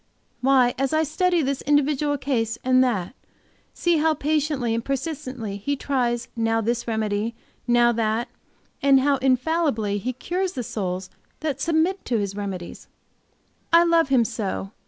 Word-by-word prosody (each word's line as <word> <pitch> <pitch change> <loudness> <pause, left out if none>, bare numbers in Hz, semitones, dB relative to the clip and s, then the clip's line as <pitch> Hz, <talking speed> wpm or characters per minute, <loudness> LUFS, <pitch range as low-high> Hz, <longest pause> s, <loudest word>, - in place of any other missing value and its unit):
Why, 255 -2 +4
as 270 +2 0
I 315 0 +3
study 345 +2 +1
this 275 0 -1
individual 290 0 +1
case 230 -5 -1
and 255 0 +4
that, 210 -6 -1 0.6
see 345 -1 +1
how 310 +1 +2
patiently 295 -5 0
and 230 0 -1
persistently 260 -6 -4
He 285 +8 -2
tries 245 -4 -1
now 225 0 +1
this 235 +2 -1
remedy, 220 0 -1 0.3
now 240 0 +4
that, 225 +1 0 0.5
and 275 -1 +5
how 280 0 +2
infallibly 255 -5 +1
He 255 +5 -3
cures 360 +8 -2
the 250 - -3
souls 185 -4 -4 0.3
that 305 -3 -2
submit 335 +4 +1
to 240 - 0
His 200 -2 -2
remedies, 195 -4 -6 0.8
I 335 +1 +7
love 335 -3 +3
Him 255 -4 +4
so! 195 -2 -4
255 Hz, 150 wpm, -24 LUFS, 225-295 Hz, 0.8 s, I